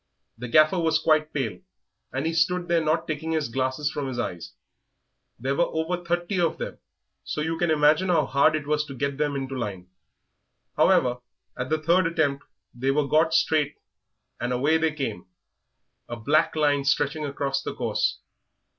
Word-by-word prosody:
The 125 +2 -7
Gaffer 155 +8 +4
was 160 -1 +2
quite 155 0 +2
pale, 115 -11 -3 0.5
and 135 +3 -2
he 165 - 0
stood 175 +2 +1
there 170 -1 +2
not 160 +2 0
taking 160 +1 -3
his 155 -5 -1
glasses 130 +4 -1
from 145 -2 -3
his 130 -2 -5
eyes. 90 -7 -4 0.9
There 135 +3 -1
were 170 - +3
over 175 +2 -2
thirty 175 +2 -1
of 165 -2 +1
them, - - -6 0.4
so - - -4
you 160 +2 -1
can 175 - +1
imagine 155 +4 +3
how 165 -5 +3
hard 140 +4 +3
it 150 -2 -3
was 150 0 +1
to 140 -2 -9
get 140 +2 -3
them 145 -1 0
into 135 -1 -4
line. 100 -7 -5 0.9
However, 125 -1 +3 0.4
at 125 +1 -4
the 155 - +2
third 170 +3 +2
attempt 155 -5 0 0.3
they 130 +3 -2
were 140 +1 +1
got 160 +3 +3
straight 150 -2 +2 0.6
and 120 +1 -2
away 145 +6 +2
they 160 0 +1
came, 130 - -5 0.8
a 120 - -4
black 145 +10 +1
line 145 -2 +2
stretching 145 +3 +1
right 150 - -2
across 140 -1 -2
the - - -5
course. - - -1
150 Hz, 180 wpm, -25 LUFS, 135-160 Hz, 0.9 s, Gaffer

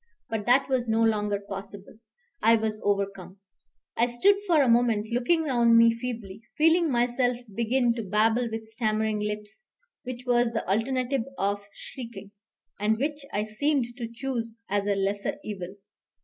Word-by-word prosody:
But 215 -2 -3
that 260 +3 +4
was 255 -3 0
no 225 +1 +3
longer 210 -2 +1
possible; 200 +1 -9 0.4
I 225 +1 +6
was 220 -1 -2
overcome. 195 -2 -2 0.6
I 235 - +3
stood 250 +13 +4
for 320 -5 +5
a - - +1
moment 230 -3 +3
looking 320 +7 +2
round 235 -5 +4
me 230 0 +6
feebly, 230 -4 -6 0.2
feeling 325 +2 +4
myself 245 0 +1 0.2
begin 235 +2 +1
to 230 - -4
babble 220 +4 +1
with 225 0 -5
stammering 220 -1 -1
lips, 210 - -5 0.4
which 250 0 -7
was 240 -1 +2
the 225 - -3
alternative 250 +4 0
of 200 +1 -1
shrieking, 235 -6 -9 0.5
and 215 +2 +2
which 290 +3 -2
I 205 - 0
seemed 240 +2 -1
to 235 -3 -4
choose 230 -2 -4
as 200 +1 -1
a 200 - +2
lesser 200 +1 -1
evil. 190 -2 -6
230 Hz, 155 wpm, -27 LUFS, 210-245 Hz, 0.6 s, I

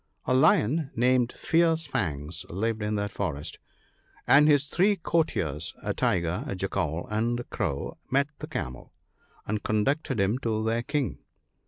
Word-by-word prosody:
A - - +1
Lion, 135 +3 +3
named 125 0 +3
"Fierce 165 -1 +2
fangs," 80 - -3
lived 110 +4 -1
in 105 0 -1
that 100 0 -2
forest; 80 -8 -4 0.7
and 150 +2 +6
his 145 -2 +5
three 190 +7 +2
courtiers, 155 - -1
a - - -1
Tiger, 85 0 0
a 100 - -3
Jackal, 90 -4 -2
and 115 +3 0
a - - -7
Crow, 70 - -3
met 140 +2 +2
the - - -6
Camel, 65 -1 -5 0.5
and 105 0 -2
conducted 130 +5 0
him 100 +6 +2
to 110 -4 -1
their 115 +1 +1
King. 145 +1 -2
110 Hz, 150 wpm, -27 LUFS, 95-140 Hz, 0.7 s, and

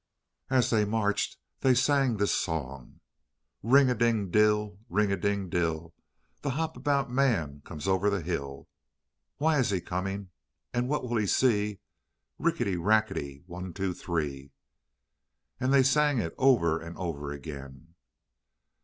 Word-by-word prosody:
And 130 - +2
as 125 - +3
they 110 -2 +3
marched 105 0 0 0.2
they 130 -1 +4
sang 135 -2 +2
this 105 0 +1
song: 70 -6 -4 0.6
"Ring 135 +4 +5
a 125 - +3
ding 115 -6 +1
dill, 105 -1 +2
ring 105 -2 +1
a - - +2
ding 100 0 -1
dill, 85 -1 -2 0.5
The 145 - -2
Hop 160 0 -2
about 140 -3 0
Man 100 - +1
comes 75 +4 -6
over 95 +2 +2
the 100 -3 -1
hill. 70 -5 -4 0.7
Why 155 0 +2
is 130 - +2
he 95 -2 +1
coming, 95 +2 -4 0.4
and 120 +1 0
what 150 -1 0
will 120 -1 0
he 105 -2 +1
see? 105 -4 +2 0.6
Rickety, 155 - 0
rackety 85 -8 0
one, 90 0 -7
two, 95 0 -2
three." 70 -6 -4 1.1
And 130 +1 +1
they 135 -1 +6
sang 145 +1 +3
it 85 -8 -2
over 105 -12 +3
and 85 +1 -9
over 75 -6 -4
again. 70 +1 -9
100 Hz, 145 wpm, -28 LUFS, 85-125 Hz, 1.1 s, they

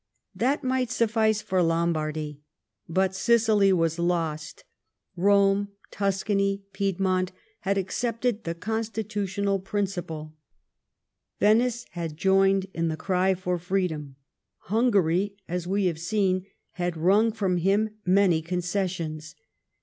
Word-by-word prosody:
That 250 +9 0
miglit 255 -1 +1
sufiiice 220 -3 +1
for 185 -1 +1
Lombardy. 155 -3 -1 0.5
But 190 +2 +1
Sicily 215 -1 +3
was 165 -2 +1
lost: 165 -3 -2 0.5
Eome, 200 +2 +3 0.2
Tuscany, 195 0 0
Piedmont, 190 -1 0 0.3
had 195 0 0
accepted 230 +3 -1
the 165 0 -3
constitutional 205 -1 -2
principle; 180 -6 -4 1.1
Venice 235 +3 +3
had 165 -3 -5
joined 195 +1 +3
in 165 0 -1
the 160 -1 -2
cry 190 +1 +1
for 180 -1 -2
freedom; 170 -6 -2 0.6
Hungary, 200 -4 +2
vi& 180 +3 -1
have 165 -3 0
seen, 185 +1 0 0.2
had 175 -2 -3
wrung 200 +7 +4
from 195 -5 0
him 200 +5 +2
many 180 -3 +3
concessions. 175 -3 -3
190 Hz, 105 wpm, -26 LUFS, 170-205 Hz, 1.1 s, wrung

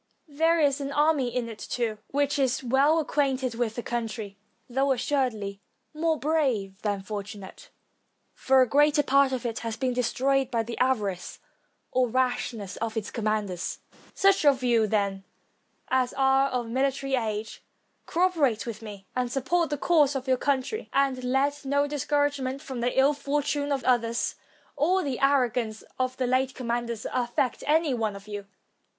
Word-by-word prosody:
There 325 +3 +2
is 285 -2 +2
an 275 0 -3
army 295 -2 +2
in 240 -1 -2
it, 225 -2 -9
too, 225 -3 -2
which 285 +1 0
is 265 -1 +1
well 270 +6 +3
acquainted 270 -5 0
with 230 -1 -2
the 240 - -4
country, 225 -4 -4 0.3
though, 270 +2 +1
assuredly, 230 -7 -1 0.3
more 320 +1 +1
brave 255 -12 0
than 205 -2 -2
fortu 205 +1 -5
nate, 205 - -12 0.6
for 265 -1 +4
a - - -1
great 295 +3 +3
part 275 0 +4
of 255 -2 -3
it 230 -1 -2
has 230 0 -4
been 255 +1 0
destroyed 260 +2 +1
by 230 -3 0
the 230 +1 -6
avarice 210 -8 0 0.5
or 255 -1 +2
rashness 245 -5 -1
of 225 0 -3
its 215 - -3
commanders. 210 -5 -2 0.4
Such 390 -2 +4
of 275 -3 +4
you, 230 -3 +3
then, 200 -2 0 0.7
as 255 -1 +1
are 270 0 +3
of 245 -3 -2
military 270 +2 -1
age, 220 -3 -2 0.5
cooperate 325 -10 +1
with 230 -2 -6
me, 205 -3 -9
and 250 -1 -1
support 325 +6 +1
the 295 - -2
cause 295 -2 +3
of 265 0 -4
your 260 - +4
country; 280 - -1
and 270 -2 +1
let 275 +3 0
no 285 +1 +1
discour 290 0 +1
agement 270 -2 -4
from 260 -3 -6
the 245 +1 0
iU 275 +2 +5
fortune 290 0 -1
of 275 -2 0
others, 235 -2 +1 0.4
or 360 +6 +2
the 270 -4 -3
arrogance 245 -5 +1 0.2
of 255 0 -1
the 255 - 0
late 260 +1 +1
commanders, 235 -2 -3
affect 245 0 -1
any 310 -1 +3
one 220 -4 -1
of 200 +1 -11
you. 205 -1 -6
255 Hz, 165 wpm, -27 LUFS, 230-280 Hz, 0.7 s, iU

